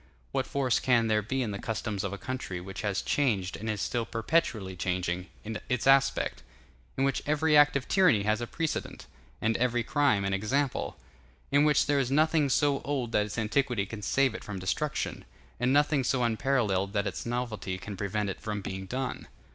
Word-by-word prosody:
What - - -1
force 130 -4 +1
can 120 -3 +3
there 110 -1 +3
be 130 +5 -1
in 110 - -3
the 100 - -4
customs 110 -2 -3
of 100 - -2
a 100 - -4
country 130 -7 -4
which 95 +3 -7
has 100 -3 -1
changed 105 -10 0
and 110 +2 -5
is 105 -2 -2
still 120 -1 -1
perpetually 115 - 0
changing 90 0 -2 0.4
its 125 -2 0
aspect; 135 0 +3 0.6
in 135 - +1
which 135 0 +1
every 155 +1 +3
act 145 -1 +6
of 135 -2 -1
tyranny 180 - +4
has 110 +2 +1
a 120 - -3
precedent, 160 +4 -3 0.4
and 110 +1 +2
every 120 -1 +1
crime 120 -6 +2
an 100 - 0
example; 125 +8 -1 0.5
in 145 +2 +5
which 150 -1 +4
there 145 -1 +2
is 130 -3 0
nothing 155 +1 +3
so 140 0 +2
old 135 -5 -2
that 105 -2 +2
its 105 - -7
antiquity 115 -1 +1
can 105 +1 -7
save 130 +4 +2
it 110 - -7
from 105 -2 -6
destruction, 95 +11 -2 0.4
and 125 +2 +2
nothing 145 0 +3
so 130 0 +1
unparalleled 110 -5 +1
that 100 -2 0
its - - -3
novelty 115 -6 -3
can 100 +2 -7
prevent 100 +2 -2
it 95 - -5
from 105 -2 -3
being 95 0 -5
done? 130 +4 -4
115 Hz, 195 wpm, -29 LUFS, 100-135 Hz, 0.6 s, act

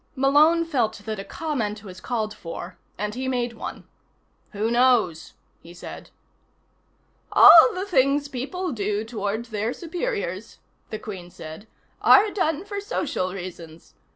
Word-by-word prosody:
Malone 300 +5 +4
felt 255 -9 0
that 215 -2 -4
a - - -5
comment 220 -8 -3
was 185 -3 -11
called 220 -4 -2
for, 175 -1 -8 0.2
and 210 +1 -3
he 260 +2 -4
made 245 -2 -1
one. 225 - -8 0.6
"Who 215 +2 -2
knows?" 235 -10 +2 0.3
he 170 +1 -14
said. 175 - -10 1.2
"All - - +9
the 370 +2 -3
things 285 -5 +2
people 300 +8 -4
do 210 -2 -2
toward 220 0 -3
their 220 +1 -3
superiors," 225 - -4 0.3
the 215 - -4
Queen 190 -5 -8
said, 160 +5 -10 0.3
"are 420 +1 +6
done 340 -3 -1
for 405 -1 -5
social 275 - -2
reasons. 175 -3 -9
225 Hz, 135 wpm, -24 LUFS, 200-290 Hz, 1.2 s, All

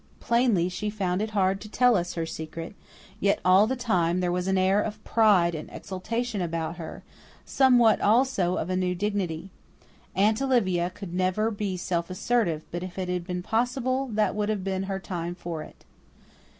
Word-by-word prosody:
Plainly 235 -7 +2
she 185 +3 -3
found 195 -3 -1
it 220 - -1
hard 195 -2 +1
to 215 - -9
tell 245 +1 +4
us 175 -2 -1
her 165 -1 -1
secret, 165 +3 -7 0.5
yet 200 0 +2
all 190 +3 +6
the 260 - -1
time 185 -8 +1
there 180 -1 0
was 180 +1 -1
an 190 0 +2
air 190 +2 +3
of 215 0 -5
pride 200 -7 +4
and 155 -1 -6
exultation 220 +3 -3
about 165 -1 -3
her; 165 - -8 0.4
somewhat, 245 -4 +4
also, 210 -5 +2
of 175 - -2
a - - 0
new 180 -1 0
dignity. 190 -3 -2 0.6
Aunt 215 +5 +3
Olivia 190 -10 +2
could 185 -1 -9
never 185 +5 +1
be 200 -3 -3
self 170 -1 -2
assertive, 185 -5 0
but 175 - -4
if 185 0 -7
it 185 -1 -3
had 180 -1 -2
been 180 -1 -3
possible 255 +4 0
that 215 -3 +1
would 210 0 -1
have 210 -3 -1
been 190 0 -2
her 195 - -1
time 175 -2 -4
for 170 -3 -5
it. - - -13
190 Hz, 185 wpm, -26 LUFS, 175-215 Hz, 0.6 s, all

